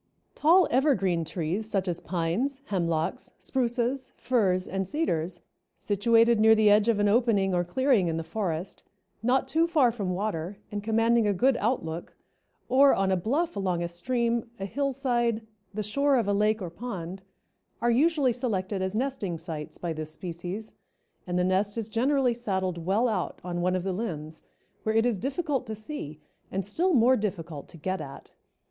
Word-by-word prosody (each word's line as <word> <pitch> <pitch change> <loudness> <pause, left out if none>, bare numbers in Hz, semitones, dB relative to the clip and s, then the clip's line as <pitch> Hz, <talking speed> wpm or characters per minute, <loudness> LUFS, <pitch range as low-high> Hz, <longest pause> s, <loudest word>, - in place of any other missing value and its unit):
Tall 340 +3 +5
evergreen 235 - +2
trees, 175 +6 -3
such 195 -2 0
as 175 -1 -2
pines, 190 +11 -1
hemlocks, 170 +3 -1
spruces, 255 +1 -1
firs 200 -7 +1
and 190 0 -2
cedars, 175 - -2 0.4
situated 230 +3 +3
near 220 +1 +7
the 215 -1 +5
edge 210 +1 +4
of 230 -3 +3
an 205 - +3
opening 205 -4 +3
or 175 0 +2
clearing 230 +1 +2
in 165 -1 -1
the 165 - -2
forest, 175 0 -3 0.4
not 255 +3 +2
too 320 +5 +2
far 295 -8 +4
from 200 -6 -3
water 195 -2 -3
and 205 0 -3
commanding 225 +1 +3
a 205 - +2
good 260 +7 +3
outlook, 175 -9 -2 0.5
or 270 +2 +6
on 190 0 +1
a - - +4
bluff 275 - 0
along 185 -3 -1
a - - -1
stream, 235 +6 -1
a 195 - -3
hillside, 240 -3 0 0.3
the 210 +1 -3
shore 280 +7 +2
of 230 -4 0
a 205 - +2
lake 210 +1 +2
or 175 - -5
pond, 190 -4 -6 0.6
are 240 - +2
usually 285 0 +3
selected 205 -6 -2
as 190 +2 -2
nesting 240 -8 -2
sites 160 -2 -7
by 170 -2 -3
this 155 -1 -5
species, 175 +6 -6 0.5
and 180 0 -1
the 180 - +2
nest 195 +3 +1
is 225 -1 -3
generally 255 +2 +2
saddled 190 -7 -2
well 215 +6 +3
out 205 -6 -2
on 175 -1 -3
one 180 +1 +1
of 185 - -1
the 190 0 -1
limbs, 160 -7 -5 0.4
where 220 0 -1
it 225 +1 +4
is 235 -6 +1
difficult 275 - -2
to 220 - -4
see 215 - -7 0.3
and 195 0 -2
still 340 - +1
more 250 +2 +5
difficult 170 - -4
to 175 - -13
get 185 +3 -3
at. 140 -2 -10
210 Hz, 175 wpm, -27 LUFS, 180-245 Hz, 0.6 s, near